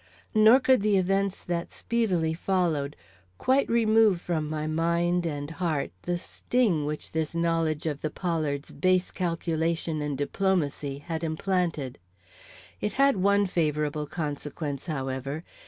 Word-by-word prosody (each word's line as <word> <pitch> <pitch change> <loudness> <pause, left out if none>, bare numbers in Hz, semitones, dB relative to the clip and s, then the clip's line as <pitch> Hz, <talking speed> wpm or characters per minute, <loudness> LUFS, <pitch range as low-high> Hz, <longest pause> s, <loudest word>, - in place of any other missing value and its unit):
Nor 220 +4 +7
could 260 -3 +4
the 205 -1 +3
events 195 +1 0
that 175 -1 -3
speedily 185 -9 0
followed 165 -5 0 0.4
quite 265 - +2
remove 220 -4 +4
from 160 -4 -2
my 155 0 -2
mind 170 +2 +1
and 145 -1 -4
heart 165 -4 -1
the 175 0 -1
sting 180 -4 0
which 150 0 -5
this 160 0 -2
knowledge 165 -2 0
of 150 -3 -2
the 155 - -1
Pollards' 155 -4 -2
base 185 0 +1
calculation 165 -2 -1
and 145 -2 -2
diplomacy 145 -3 -1
had 165 -1 -3
implanted. 160 -4 -1 0.8
It 210 - -2
had 275 -1 +4
one 200 +1 +3
favorable 150 -4 -1
consequence, 150 -1 -4
however. 135 0 -3
165 Hz, 130 wpm, -27 LUFS, 150-190 Hz, 0.8 s, Nor